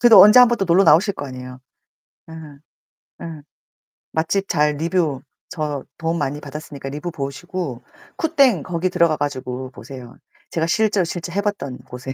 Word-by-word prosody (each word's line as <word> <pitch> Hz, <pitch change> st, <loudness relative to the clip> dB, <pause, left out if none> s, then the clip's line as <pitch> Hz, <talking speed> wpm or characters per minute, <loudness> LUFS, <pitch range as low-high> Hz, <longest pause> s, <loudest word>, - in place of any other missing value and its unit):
그래도 240 Hz, -2 st, +9 dB
언제 210 Hz, +5 st, +8 dB
한번 240 Hz, -1 st, +6 dB
또 195 Hz, -, +1 dB
놀러 180 Hz, +2 st, +4 dB
나오실 190 Hz, +6 st, +5 dB
거 145 Hz, -, -6 dB
아니에요. 125 Hz, -1 st, -9 dB, 0.7 s
예. -, -, -9 dB, 0.9 s
예. 160 Hz, -3 st, -8 dB, 0.7 s
맛집 190 Hz, +5 st, 0 dB
잘 150 Hz, 0 st, +2 dB
리뷰 160 Hz, -4 st, 0 dB, 0.3 s
저 150 Hz, -4 st, -3 dB
도움 165 Hz, +1 st, -1 dB
많이 145 Hz, -1 st, -2 dB
받았으니까 145 Hz, -1 st, -8 dB
리뷰 150 Hz, +5 st, -5 dB
보시고 140 Hz, -1 st, -5 dB, 0.3 s
쿠땡 275 Hz, -, +3 dB
거기 180 Hz, 0 st, -1 dB
들어가 170 Hz, -3 st, +3 dB
가지고 130 Hz, -3 st, -4 dB
보세요. 125 Hz, +2 st, -11 dB, 0.4 s
제가 165 Hz, -1 st, 0 dB
실제로 210 Hz, +1 st, +2 dB
실제 175 Hz, 0 st, -5 dB
해 200 Hz, +4 st, 0 dB
봤던 195 Hz, -11 st, -3 dB
곳에. 125 Hz, +1 st, -8 dB
160 Hz, 320 characters per minute, -21 LUFS, 135-185 Hz, 0.9 s, 그래도